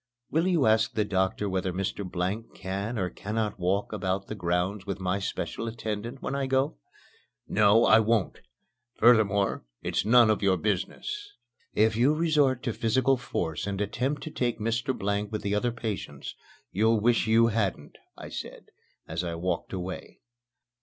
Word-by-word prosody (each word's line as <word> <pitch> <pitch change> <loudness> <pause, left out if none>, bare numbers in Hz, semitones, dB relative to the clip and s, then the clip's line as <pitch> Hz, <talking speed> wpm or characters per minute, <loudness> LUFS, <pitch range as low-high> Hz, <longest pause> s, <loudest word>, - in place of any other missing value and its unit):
"Will 165 +4 +2
you 170 -7 +3
ask 110 +1 +3
the 105 -2 +1
doctor 95 0 0
whether 95 -1 -1
Mr. 95 +2 -3
Blank 95 +5 -3
can 100 +5 -4
or 90 -3 -1
cannot 105 0 -3
walk 95 +4 0
about 95 -1 -1
the - - -6
grounds 90 +1 -1
with 100 -1 -3
my 95 +1 -1
special 115 +3 -3
attendant 115 +2 -5
when - - -2
I 140 -1 -1
go?" 130 - +1 0.7
"No, 105 +2 +5
I 110 - +7
won't. 110 -2 +1 0.6
Furthermore, 105 -4 +4 0.2
it's - - 0
none 115 +1 +6
of 105 - 0
your 95 -2 +3
business." 410 - -3 0.4
"If 110 +1 +3
you 130 +7 +3
resort 150 -6 +2
to 120 - -1
physical 130 +5 +2
force 90 -7 -3
and 100 -1 -3
attempt 125 +8 -1
to 155 - -6
take 120 -4 -1
Mr. 115 +4 -1
Blank 100 +1 -1
with 105 -1 -3
the 100 0 -1
other 110 +4 +1
patients, 105 - -5 0.4
you'll 110 +3 +3
wish 115 +1 +2
you 115 +1 +5
hadn't," 100 -9 -2 0.2
I - - -8
said, - - -8 0.4
as 80 +2 -3
I 85 -1 -3
walked 85 0 -2
away. 95 -1 -6
105 Hz, 165 wpm, -28 LUFS, 95-120 Hz, 0.7 s, I